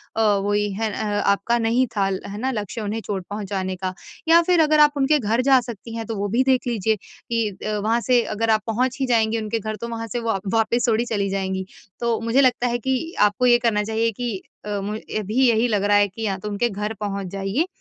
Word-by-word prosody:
अ, 225 - +1 0.2
वोई 205 0 +1
है 220 -1 0
अ 205 -1 -1
आपका 235 +4 +1
नहीं 235 +3 +2
था 200 - +2
है 195 +1 -4
ना 260 +3 -1
लक्ष्य 215 -1 -4
उन्हें 215 +2 -3
चोट 190 -3 -3
पहुँचाने 195 -2 -3
का 185 0 -4 0.3
या 335 +1 +7
फिर 355 -1 +3
अगर 305 0 +4
आप 295 0 +7
उनके 285 +2 +3
घर 230 +2 +1
जा 265 -1 +7
सकती 230 -1 -8
हैं 225 - -4
तो 225 - -3
वो 205 0 -2
भी 260 - +4
देख 260 -1 +2
लीजिए 220 -2 +1
कि 230 +2 -4 0.2
अ, 215 0 -1
वहाँ 220 +3 +1
से 245 0 +3
अगर 225 +1 0
आप 215 -1 +3
पहुँच 250 +4 0
ही - - +2
जाएँगी 225 -2 +2
उनके 220 +1 -2
घर 215 +1 -4
तो 235 - -3
वहाँ 230 -1 -4
से 240 - -1
वा 225 -4 -1
वापस 230 +2 +2
थोड़ी 230 +1 +2
चली 205 -4 -1
जाएँगी। 190 -1 -2 0.3
तो 235 -1 0
मुझे 230 +4 +3
लगता 250 -2 +3
है 240 0 0
कि 260 +2 0 0.2
आपको 210 +4 +3
ये 240 -1 +6
करना 210 -3 +2
चाहिए 225 +1 0
कि 235 -2 -3 0.3
अ, 205 -1 -2
मु 210 +2 -3 0.2
अभी 225 +6 +2
यही 230 +1 +3
लग 210 -4 0
रहा 205 0 +4
है 205 0 +4
कि 220 +4 -8
या 195 -2 -1
तो 210 +2 -6
उनके 225 +4 0
घर 210 +2 -3
पहुँच 200 -2 -3
जाइए 195 - 0
225 Hz, 240 wpm, -22 LUFS, 205-240 Hz, 0.3 s, या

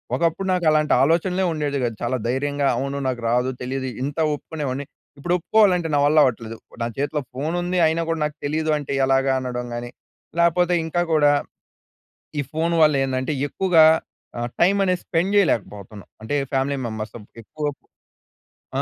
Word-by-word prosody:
ఒకప్పుడు 170 +3 0
నాకు 180 -2 0
అలాంటి 155 0 +2
ఆలోచనలే 175 +5 +1
ఉండేది 145 -2 -2
కాదు. 115 -2 -1
చాలా 120 +2 -1
ధైర్యంగా 140 +3 0
అవును 140 +2 -3
నాకు 125 -2 -2
రాదు. 125 +2 +1
తెలీదు. 130 +1 -3 0.2
ఇంత 140 +2 -4 0.2
ఒప్పుకునేవాడిని. 145 -2 -4 0.3
ఇప్పుడు 175 +5 -2
ఒప్పుకోవాలంటే 180 -2 +3
నా - - +3
వల్ల 150 +2 +3
అవ్వట్లేదు. 115 -2 -2 0.3
నా - - 0
చేతిలో 145 +1 -1
ఫోన్ 150 +6 -3
ఉంది. 180 +1 -2
అయినా 160 +1 0
గూడా 165 -1 -1
నాకు 150 0 -4
తెలీదు 155 +2 -1
అంటే 145 -2 -6
ఎలాగా 135 0 +2
అనడం 125 -1 -4
గానీ 120 0 -5 0.5
లేపోతే 175 +1 +3
ఇంకా 175 +2 -1
గూడా 145 -2 +5 1.1
ఈ - - +2
ఫోన్ 165 +2 0
వల్ల 150 -2 +5
ఏందంటే 130 +3 -2
ఎక్కువుగా 165 0 +4 0.5
ఆహ్, 120 +1 -2
టైమ్ 190 +4 +4
అనేది 180 -2 +1
స్పెండ్ 175 +4 0
చెయ్యలేకపోతన్నాం. 105 - -1
అంటే 115 +7 -3 0.2
ఫ్యామిలీ 135 +1 0
మెంబర్స్ 110 -1 -5
సమ్ 110 -3 -10 0.2
ఎక్కువ 150 +7 -6 1.1
ఆ! - - +2
145 Hz, 160 wpm, -22 LUFS, 130-165 Hz, 1.1 s, గూడా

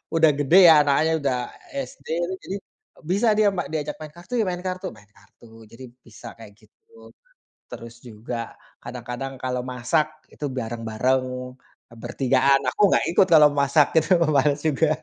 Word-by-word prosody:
udah 160 -2 +5
gede 145 +6 +4
ya, 165 - +9
anaknya 145 +3 +1
udah 135 -3 0 0.5
SD, - - -19 0.4
jadi 195 - -5 0.5
bisa 200 +7 0
dia 215 -1 +4
ma 175 - -2
diajak 150 -1 -3
main 155 - -8
kartu 175 +7 -12
ya, - - +2
main 180 - -3
kartu 185 0 -4
main 105 - -19
kartu 115 +3 -19
jadi 130 +3 -11 0.2
bisa 115 +1 -12
kayak 110 -2 -13
gitu. 455 - -20 0.6
Terus 115 0 -10
juga 120 0 -8 0.5
kadang-kadang 125 +2 -7
kalau 125 -1 -2
masak 150 +5 -2
itu 150 - -8
bareng-bareng, 115 +3 -1 0.8
bertigaan, 135 +2 +2
aku - - -1
nggak - - +2
ikut - - +5
kalo 150 -1 +8
masak 140 +1 +3 0.2
itu, - - -9 0.3
males 145 +1 +2
juga 155 +1 +1
135 Hz, 150 wpm, -23 LUFS, 120-160 Hz, 0.8 s, ya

